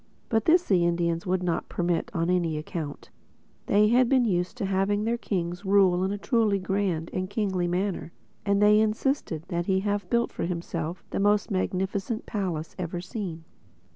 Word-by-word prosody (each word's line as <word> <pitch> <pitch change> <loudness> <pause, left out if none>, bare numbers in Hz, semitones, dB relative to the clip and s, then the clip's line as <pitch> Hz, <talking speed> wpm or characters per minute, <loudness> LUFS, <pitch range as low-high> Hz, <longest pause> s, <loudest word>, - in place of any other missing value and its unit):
But 225 -1 +1
this 345 +2 +5
the 185 - +2
Indians 170 0 0
would 180 0 0
not 170 -2 -1
permit 175 +4 -1
on 165 -5 -1
any 170 -4 +1
account. 155 -1 -6 0.6
They 210 +1 +4
had 245 +1 +4
been 260 -3 +4
used 180 +1 -1
to 215 - -2
having 195 +2 +1
their 230 +2 +1
kings 180 -5 -3
rule 190 -2 +4
in 190 - 0
a 205 - -2
truly 220 -2 +2
grand 185 -4 -1
and 185 0 -2
kingly 190 -4 0
manner; 180 -1 -2 0.3
and 200 0 +2
they 210 0 +6
insisted 215 - 0
that 175 0 -2
he 190 -1 +2
have 205 -2 -2
built 235 0 +1
for - - -3
himself 170 -1 -4
the - - -1
most 205 +2 +2
magnificent 195 +3 -1
palace 175 -7 -3
ever 175 -1 -3
seen. 180 -3 -5
190 Hz, 175 wpm, -27 LUFS, 175-210 Hz, 0.6 s, they